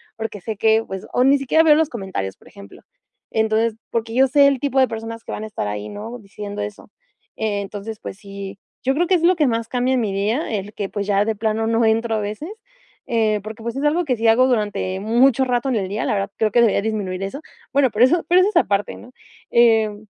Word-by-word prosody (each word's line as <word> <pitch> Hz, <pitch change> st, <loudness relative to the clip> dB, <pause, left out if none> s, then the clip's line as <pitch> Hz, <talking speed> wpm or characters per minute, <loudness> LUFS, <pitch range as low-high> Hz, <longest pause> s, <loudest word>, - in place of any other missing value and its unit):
porque 220 Hz, -3 st, -5 dB
sé 220 Hz, +3 st, -4 dB
que, 220 Hz, +1 st, +3 dB
pues". 190 Hz, 0 st, -6 dB
O 250 Hz, -, +3 dB
ni 275 Hz, +1 st, +5 dB
siquiera 275 Hz, +4 st, +3 dB
veo 305 Hz, -2 st, +7 dB
los 315 Hz, 0 st, +2 dB
comentarios, 190 Hz, -, -5 dB
por -, -, -21 dB
ejemplo. 200 Hz, 0 st, -14 dB, 0.5 s
Entonces 220 Hz, 0 st, +1 dB, 0.2 s
porque 230 Hz, 0 st, -2 dB
yo 265 Hz, +1 st, +5 dB
sé 280 Hz, +2 st, +5 dB
el 275 Hz, -2 st, +1 dB
tipo 275 Hz, 0 st, 0 dB
de 260 Hz, -, +5 dB
personas 225 Hz, 0 st, -6 dB
que -, -, -8 dB
van 215 Hz, -, -5 dB
a -, -, -5 dB
estar 210 Hz, -, -4 dB
ahí, 105 Hz, 0 st, -4 dB
¿no?, 225 Hz, -, -7 dB
diciendo 205 Hz, 0 st, -7 dB
eso. 205 Hz, 0 st, -8 dB, 0.5 s
Eh, 215 Hz, -2 st, -1 dB
entonces, 205 Hz, +2 st, -7 dB
pues -, -, -8 dB
sí, 200 Hz, -1 st, -8 dB, 0.3 s
yo 265 Hz, -, +2 dB
creo 345 Hz, +4 st, +1 dB
que 375 Hz, -, +4 dB
es 335 Hz, -, 0 dB
lo 360 Hz, +2 st, +5 dB
que 305 Hz, -4 st, +2 dB
más 230 Hz, -1 st, -1 dB
cambia 250 Hz, +2 st, 0 dB
en -, -, +1 dB
mi 210 Hz, -3 st, -2 dB
día, 215 Hz, +10 st, -1 dB
el 205 Hz, -1 st, -3 dB
que, 200 Hz, -2 st, -4 dB
pues, 200 Hz, -1 st, -4 dB
ya 200 Hz, 0 st, +2 dB
de 220 Hz, 0 st, -1 dB
plano 220 Hz, +1 st, -1 dB
no 230 Hz, +1 st, +2 dB
entro 225 Hz, +1 st, +1 dB
a -, -, 0 dB
veces, 210 Hz, -, -5 dB, 0.6 s
eh, 220 Hz, -2 st, +1 dB
porque, 220 Hz, +1 st, -8 dB
pues, 235 Hz, +1 st, -4 dB
es 275 Hz, -, -3 dB
algo 320 Hz, +4 st, +2 dB
que 260 Hz, -4 st, +1 dB
sí 225 Hz, +1 st, +1 dB
hago 240 Hz, +3 st, +5 dB
durante 210 Hz, -5 st, -1 dB
mucho 240 Hz, +4 st, +3 dB
rato 250 Hz, +1 st, 0 dB
en 255 Hz, -, 0 dB
el 195 Hz, -4 st, -1 dB
día, 205 Hz, +2 st, -2 dB
la -, -, 0 dB
verdad, 195 Hz, -1 st, -2 dB
creo 220 Hz, -1 st, +1 dB
que 240 Hz, -, +4 dB
debería 225 Hz, -4 st, +3 dB
disminuir 200 Hz, -4 st, -3 dB
eso. 235 Hz, +10 st, -5 dB, 0.3 s
Bueno, 275 Hz, -1 st, +4 dB
pero 225 Hz, +4 st, +5 dB
eso 335 Hz, +6 st, +2 dB
pero 360 Hz, +1 st, +6 dB
eso 385 Hz, -, +3 dB
es 425 Hz, -, -8 dB
aparte, 205 Hz, -10 st, +1 dB
¿no? 245 Hz, -, -14 dB, 0.4 s
Em, 220 Hz, -3 st, +3 dB
225 Hz, 245 wpm, -21 LUFS, 205-255 Hz, 0.6 s, veo